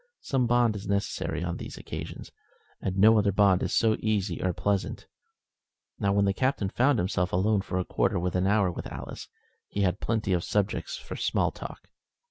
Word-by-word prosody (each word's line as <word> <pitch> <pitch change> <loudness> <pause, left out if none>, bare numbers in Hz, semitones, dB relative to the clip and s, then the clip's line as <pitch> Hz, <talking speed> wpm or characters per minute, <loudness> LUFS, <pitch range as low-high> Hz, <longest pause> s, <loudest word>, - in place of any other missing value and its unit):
Some 130 -3 0
bond 120 -2 +3
is 100 -1 -6
necessary 100 -4 -1
on 85 -1 -3
these - - -8
occasions, - - -7 0.5
and 95 0 -2
no 110 +3 +6
other 100 -1 +2
bond 100 -1 +4
is - - -1
so 110 -2 +3
easy 105 -5 -1
or 95 - +1
so - - -1
pleasant. 100 +2 -1 0.9
Now, 100 - +1
when 100 0 +3
the 100 - +2
Captain 130 -3 0
found 130 +6 +3
himself 90 -1 0
alone 100 +3 +2
for 90 - -3
a 90 - 0
quarter - - +1
of 90 0 -1
an 90 +1 +2
hour 100 -3 +3
with - - -6
Alice, - - -7 0.4
he 100 - -3
had 95 0 +1
plenty 110 -4 0
of 85 -1 +1
subjects 105 - -1
for - - -8
small - - +1
talk. - - -9
100 Hz, 195 wpm, -28 LUFS, 95-110 Hz, 0.9 s, no